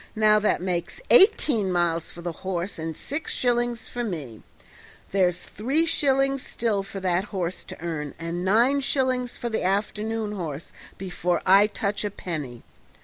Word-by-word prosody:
Now 215 -1 +5
that 210 -4 +1
makes 175 - -2
eighteen 275 - +5
miles 170 -2 0
for 170 - -11
the 175 - -2
horse 185 +1 -4
and 160 -1 -4
six 290 +4 -4
shillings 240 -1 0
for 245 - -4
me; 150 - -5 0.7
there's 180 -2 +2
three 270 - 0
shillings 275 -4 +2
still 220 -5 -1
for 195 0 -7
that 185 +1 +1
horse 185 -3 -3
to - - -9
earn 155 -4 -4
and 170 +1 -4
nine 235 +9 +4
shillings 255 -2 0
for 240 - -3
the 220 - -1
afternoon 210 +3 -1
horse 165 -7 -5 0.2
before 180 -2 -1
I 195 +3 +7
touch 205 -1 -2
a 205 - -1
penny. 150 - -6
195 Hz, 155 wpm, -25 LUFS, 175-235 Hz, 0.7 s, I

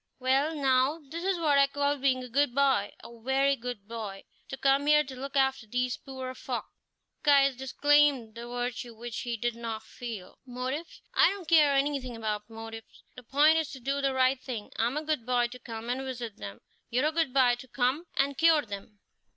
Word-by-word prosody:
"Well, 270 +5 +1
now, 270 +2 +2
this 335 +2 -5
is 380 -1 +1
what 300 -4 +3
I 275 - +6
call 285 +1 0
being 260 -1 +1
a - - -7
good 255 0 +1
boy 265 -8 +2
a 235 -1 -12
very 270 +3 +2
good 240 -5 -7
boy 215 -4 -6 0.3
to 270 - -5
come 275 +2 +2
here 300 0 +6
to 270 -2 -9
look 275 +2 -7
after 265 -4 +1
these 250 +2 -1
poor 260 -1 -7
folk." - - -4 0.6
Caius 275 -2 +5
disclaimed 270 -2 +2
the 235 +1 -8
virtue 245 -1 -4
which 235 0 -6
he 235 -1 -3
did 240 +1 -1
not 230 -2 -5
feel. 225 -7 -8
"Motives! 260 +5 -5
I - - +6
don't 390 -4 -6
care 300 -4 +5
anything 275 -3 0
about 215 -1 -3
motives. 225 0 -10
The 250 - -10
point 295 +6 +4
is 315 - -2
to 265 - -8
do 275 +3 -1
the 270 -1 0
right 260 0 +3
thing. 230 -6 -6
I'm 240 +5 0
a 305 - -2
good 305 -6 -1
boy 245 0 +1
to 250 +1 -10
come 230 -1 -7
and 250 +2 -1
visit 245 -5 -6
them; 100 0 -8 0.3
you're 250 +5 +1
a 305 - +2
good 320 -4 0
boy 250 -2 +4
to 260 - -11
come 260 +7 0
and 275 +1 +2
cure 325 -2 +5
them. 205 -1 -9
260 Hz, 205 wpm, -29 LUFS, 235-280 Hz, 0.6 s, I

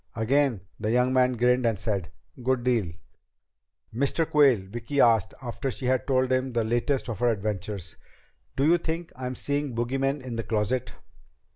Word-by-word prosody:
Again 120 -1 +1 0.2
the 105 0 -2
young 125 +2 +2
man 130 -1 +3
grinned 125 +1 +2
and 115 -3 +1
said, 100 -5 -2 0.3
"Good 125 0 0
deal!" 115 -9 +1 1.0
"Mr. 140 +6 +1
Quayle," 135 -9 +4
Vicki 120 +7 -4
asked, 115 -6 +4
after 130 +3 -3
she 130 - -5
had 130 0 +1
told 130 -1 +2
the 130 -2 0
latest 120 +5 0
of 115 -4 -4
her 120 0 +3
adventures, 100 -4 -3 0.6
"do 135 - +1
you 170 +3 +4
think 165 +1 -4
I'm 130 0 -4
seeing 145 -2 -2
bogeymen 135 +4 -1
in 120 -3 -5
the 115 - -2
closet?" 110 +3 -1
125 Hz, 160 wpm, -26 LUFS, 115-135 Hz, 1.0 s, Quayle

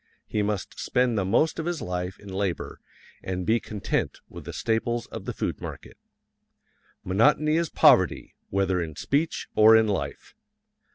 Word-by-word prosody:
He 105 - -1
must 105 -3 -3
spend 125 -2 +1
the 100 - +1
most 155 - +1
of 160 - -3
his 175 -2 -2
life 90 -2 -4
in 100 - -14
labor 95 -2 -3 0.4
and 90 -1 -4
be 115 +1 +3
content 105 -2 -3
with - - -11
the - - -6
staples 115 +1 -1
of - - -8
the - - -2
food - - -4
market. - - -8 1.1
Monotony 150 +11 +3
is 170 -1 +1
poverty, - - +4 0.2
whether 95 -2 +1
in 80 -3 -5
speech 150 - -1
or 110 +1 +8
in 110 -1 +3
life. 100 -2 -4
105 Hz, 160 wpm, -26 LUFS, 95-125 Hz, 1.1 s, or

